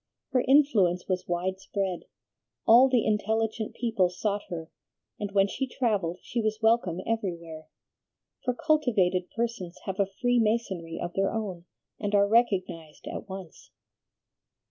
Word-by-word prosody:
Her 255 Hz, -, +2 dB
influence 225 Hz, -11 st, +4 dB
was 185 Hz, -1 st, -2 dB
wide 185 Hz, +2 st, -1 dB
spread; 190 Hz, -2 st, -3 dB, 0.6 s
all 245 Hz, +4 st, +7 dB
the 250 Hz, -3 st, +2 dB
intelligent 220 Hz, +1 st, 0 dB
people 225 Hz, -7 st, +1 dB
sought 200 Hz, +3 st, -2 dB
her, 165 Hz, -2 st, -6 dB, 0.5 s
and 205 Hz, -1 st, -3 dB
when 195 Hz, -1 st, +4 dB
she 265 Hz, +6 st, -3 dB
travelled 205 Hz, -10 st, -1 dB
she 240 Hz, -, -2 dB
was 215 Hz, 0 st, -1 dB
welcome 220 Hz, -6 st, +2 dB
everywhere, 170 Hz, -8 st, -3 dB, 0.8 s
for 250 Hz, -, 0 dB
cultivated 225 Hz, -, +2 dB
persons 230 Hz, -7 st, -3 dB
have 190 Hz, 0 st, -4 dB
a 200 Hz, -, +3 dB
free 245 Hz, +5 st, +1 dB
masonry 200 Hz, -7 st, -1 dB
of 175 Hz, 0 st, -4 dB
their 195 Hz, 0 st, +1 dB
own, 195 Hz, -6 st, -4 dB, 0.3 s
and 205 Hz, 0 st, -1 dB
are 200 Hz, 0 st, +5 dB
recognized 190 Hz, -8 st, 0 dB
at -, -, -6 dB
once." 190 Hz, -4 st, -9 dB
200 Hz, 140 wpm, -28 LUFS, 180-230 Hz, 0.8 s, all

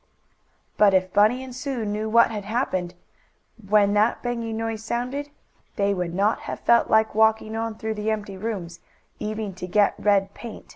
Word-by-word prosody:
But 200 Hz, -2 st, +5 dB
if 185 Hz, 0 st, +1 dB
Bunny 220 Hz, +5 st, +3 dB
and 260 Hz, -1 st, -9 dB
Sue 255 Hz, -3 st, -3 dB
knew 210 Hz, +1 st, -2 dB
what 235 Hz, +1 st, +5 dB
had 210 Hz, -2 st, -4 dB
happened 190 Hz, -6 st, -2 dB, 0.7 s
when 205 Hz, -1 st, +4 dB
that 210 Hz, +3 st, +2 dB
banging 230 Hz, -2 st, -3 dB
noise 225 Hz, -1 st, -3 dB
sounded, 250 Hz, +6 st, -3 dB, 0.5 s
they 200 Hz, 0 st, +1 dB
would 180 Hz, -2 st, -3 dB
not 205 Hz, +3 st, +2 dB
have -, -, -5 dB
felt 235 Hz, -, +3 dB
like 220 Hz, 0 st, +3 dB
walking 220 Hz, 0 st, +2 dB
on 225 Hz, 0 st, -3 dB
through 220 Hz, 0 st, -3 dB
the 210 Hz, 0 st, -3 dB
empty 210 Hz, -2 st, -3 dB
rooms, 190 Hz, -5 st, -5 dB, 0.4 s
even 215 Hz, -1 st, -4 dB
to 180 Hz, 0 st, -7 dB
get 205 Hz, +2 st, +3 dB
red 200 Hz, -1 st, +2 dB
paint. 235 Hz, -2 st, -10 dB
215 Hz, 175 wpm, -24 LUFS, 200-225 Hz, 0.7 s, But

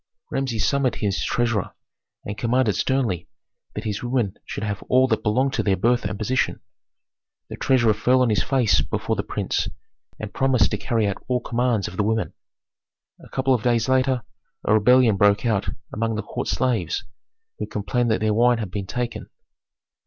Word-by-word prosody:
Rameses 120 Hz, -6 st, -1 dB
summoned 140 Hz, +1 st, +1 dB
his 100 Hz, -2 st, -1 dB
treasurer, 120 Hz, -5 st, -1 dB, 0.5 s
and 100 Hz, -, -4 dB
commanded 115 Hz, -1 st, +1 dB
sternly 120 Hz, -10 st, 0 dB, 0.5 s
that -, -, -4 dB
his 105 Hz, -2 st, -3 dB
women 120 Hz, -5 st, 0 dB
should -, -, -5 dB
have 100 Hz, -2 st, -3 dB
all 130 Hz, +1 st, +5 dB
that 110 Hz, -3 st, 0 dB
belonged 130 Hz, +6 st, +1 dB
to -, -, +1 dB
their 95 Hz, -2 st, +1 dB
birth 120 Hz, +4 st, +2 dB
and 100 Hz, 0 st, -3 dB
position. 125 Hz, +5 st, 0 dB, 0.9 s
The -, -, -6 dB
treasurer 120 Hz, -5 st, +3 dB
fell 125 Hz, +4 st, +3 dB
on 120 Hz, -, +2 dB
his 105 Hz, -, +2 dB
face 130 Hz, -5 st, +2 dB
before -, -, -2 dB
the -, -, -1 dB
prince, -, -, -2 dB, 0.5 s
and 110 Hz, -1 st, -6 dB
promised 130 Hz, -5 st, +2 dB
to -, -, 0 dB
carry 115 Hz, -4 st, 0 dB
out 100 Hz, -1 st, -3 dB
all 125 Hz, -1 st, +1 dB
commands 120 Hz, -4 st, 0 dB
of 90 Hz, -, -9 dB
the 105 Hz, -, +2 dB
women. 110 Hz, +1 st, -1 dB, 0.9 s
A -, -, -14 dB
couple 130 Hz, 0 st, +1 dB
of 120 Hz, -, +1 dB
days 115 Hz, -1 st, +1 dB
later, 130 Hz, -2 st, +2 dB, 0.4 s
a -, -, +2 dB
rebellion 115 Hz, 0 st, +5 dB
broke 100 Hz, +3 st, +3 dB
out 110 Hz, -4 st, +1 dB, 0.2 s
among 115 Hz, 0 st, -1 dB
the 110 Hz, -, -3 dB
court -, -, -5 dB
slaves, 115 Hz, -7 st, 0 dB, 0.6 s
who -, -, -3 dB
complained 120 Hz, +4 st, -1 dB
that 110 Hz, -, +1 dB
their 110 Hz, -1 st, +2 dB
wine 120 Hz, +2 st, +4 dB
had 105 Hz, -5 st, -5 dB
been 100 Hz, -1 st, -4 dB
taken. 120 Hz, -2 st, -4 dB
115 Hz, 180 wpm, -23 LUFS, 105-125 Hz, 0.9 s, all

